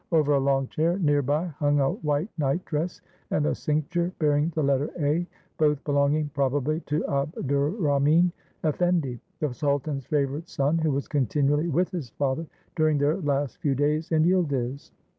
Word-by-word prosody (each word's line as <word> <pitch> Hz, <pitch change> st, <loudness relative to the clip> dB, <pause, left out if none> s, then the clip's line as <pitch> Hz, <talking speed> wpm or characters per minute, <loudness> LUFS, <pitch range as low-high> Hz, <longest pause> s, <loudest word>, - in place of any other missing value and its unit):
Over 150 Hz, -3 st, +3 dB
a 140 Hz, -, +4 dB
long 135 Hz, -1 st, +1 dB
chair 165 Hz, +3 st, +1 dB
near 145 Hz, -6 st, +2 dB
by 145 Hz, +5 st, 0 dB
hung 145 Hz, -3 st, 0 dB
a 135 Hz, -1 st, +2 dB
white 150 Hz, +4 st, -1 dB
night 150 Hz, +3 st, -1 dB
dress 165 Hz, +3 st, -3 dB, 0.3 s
and 150 Hz, -, +1 dB
a -, -, +1 dB
cincture 170 Hz, +4 st, -1 dB
bearing 150 Hz, +1 st, +2 dB
the 155 Hz, -, +1 dB
letter 140 Hz, +1 st, +1 dB
"A," 155 Hz, +4 st, +1 dB, 0.3 s
both 150 Hz, -2 st, +2 dB
belonging 145 Hz, +1 st, +1 dB
prob 140 Hz, -2 st, +1 dB
ably 150 Hz, +3 st, 0 dB
to 150 Hz, +2 st, 0 dB
Abdurrahmin 145 Hz, -, +1 dB, 0.3 s
Effendi, 155 Hz, -5 st, +1 dB, 0.2 s
the 150 Hz, -5 st, 0 dB
sultan's 140 Hz, -1 st, -1 dB
favorite 145 Hz, +2 st, -1 dB
son, 145 Hz, +4 st, +1 dB
who 160 Hz, -1 st, +1 dB
was 140 Hz, -1 st, -1 dB
continually 145 Hz, +2 st, +1 dB
with 175 Hz, +3 st, +1 dB
his 160 Hz, -9 st, -4 dB
father 140 Hz, +6 st, -2 dB, 0.3 s
during 155 Hz, -3 st, +2 dB
their 145 Hz, +2 st, +2 dB
last 145 Hz, -3 st, -1 dB
few 150 Hz, -6 st, 0 dB
days 150 Hz, +4 st, 0 dB
in 155 Hz, -1 st, +4 dB
Yildiz. 140 Hz, -7 st, 0 dB
150 Hz, 165 wpm, -26 LUFS, 140-160 Hz, 0.3 s, a